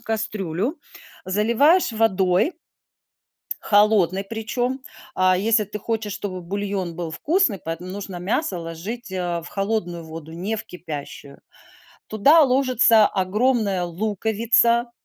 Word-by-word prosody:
кастрюлю, 215 Hz, -, -3 dB, 0.5 s
заливаешь 235 Hz, -, +3 dB
водой, 195 Hz, -, +2 dB, 1.1 s
холодной 205 Hz, -3 st, +3 dB
причем, 240 Hz, +5 st, -3 dB, 0.4 s
а 185 Hz, 0 st, +3 dB
если 215 Hz, +2 st, +2 dB
ты 210 Hz, +1 st, -7 dB
хочешь, 220 Hz, -2 st, -3 dB
чтобы 190 Hz, -4 st, -5 dB
бульон 195 Hz, -1 st, -3 dB
был 170 Hz, -2 st, -5 dB
вкусный, 295 Hz, -, +1 dB
поэтому 165 Hz, +3 st, -6 dB
нужно 195 Hz, -1 st, -6 dB
мясо 195 Hz, -, -1 dB
ложить, 175 Hz, +7 st, -7 dB
э, 175 Hz, -2 st, -2 dB
в -, -, -8 dB
холодную 195 Hz, -5 st, -2 dB
воду, 160 Hz, 0 st, -9 dB
не 185 Hz, +7 st, -3 dB
в 220 Hz, -, -5 dB
кипящую. 150 Hz, -7 st, -9 dB, 0.7 s
Туда 275 Hz, +10 st, +5 dB
ложится 255 Hz, -5 st, +4 dB
огромная 205 Hz, 0 st, 0 dB
луковица, 220 Hz, +5 st, +1 dB
205 Hz, 110 wpm, -22 LUFS, 180-225 Hz, 1.1 s, Туда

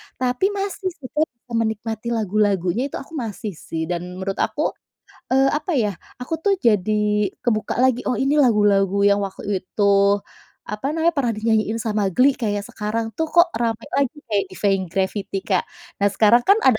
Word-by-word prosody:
tapi 250 Hz, +8 st, +1 dB
masih 390 Hz, -1 st, -3 dB
sih 280 Hz, -7 st, -10 dB
Kak 310 Hz, +1 st, +1 dB, 0.2 s
kumenikmati 225 Hz, -1 st, -2 dB
lagu-lagunya 205 Hz, +2 st, +1 dB
itu -, -, -8 dB
aku 275 Hz, -, -8 dB
masih 215 Hz, -2 st, -4 dB
sih 160 Hz, 0 st, -5 dB
dan 175 Hz, +1 st, -2 dB, 0.2 s
menurut 190 Hz, +1 st, -4 dB
aku, -, -, 0 dB, 0.6 s
eee, 265 Hz, +1 st, +4 dB
apa 305 Hz, +5 st, -2 dB
ya 210 Hz, -3 st, +1 dB, 0.3 s
aku 250 Hz, +6 st, -4 dB
tuh 400 Hz, +1 st, +2 dB
jadi 210 Hz, -, +2 dB
kebuka 215 Hz, -3 st, 0 dB
lagi, 255 Hz, -1 st, +3 dB
oh 250 Hz, -, 0 dB
ini 275 Hz, +2 st, +2 dB
lagu-lagu 200 Hz, -5 st, +3 dB
yang 200 Hz, 0 st, +4 dB
waktu 195 Hz, 0 st, -3 dB
itu 205 Hz, +2 st, -2 dB, 0.8 s
apa 210 Hz, +5 st, -4 dB
namanya 330 Hz, +1 st, +2 dB
pernah 255 Hz, -4 st, +1 dB
dinyanyiin 220 Hz, 0 st, +1 dB
sama 210 Hz, -3 st, 0 dB
Glee 255 Hz, +9 st, +4 dB
kayak 205 Hz, -4 st, -2 dB
sekarang 225 Hz, +2 st, -3 dB
tuh 320 Hz, -, 0 dB
kok 345 Hz, +1 st, +5 dB
rame 230 Hz, 0 st, -1 dB
lagi 275 Hz, 0 st, +1 dB
kayak 205 Hz, -3 st, +1 dB, 0.2 s
Vein 195 Hz, -2 st, +2 dB
Gravity 195 Hz, +1 st, -2 dB
Kak. 190 Hz, -3 st, +2 dB, 0.4 s
Nah 200 Hz, -, +4 dB
sekarang 220 Hz, +4 st, +4 dB
kan 400 Hz, +3 st, +7 dB
ada 255 Hz, -5 st, +5 dB
220 Hz, 170 wpm, -22 LUFS, 200-255 Hz, 0.8 s, kan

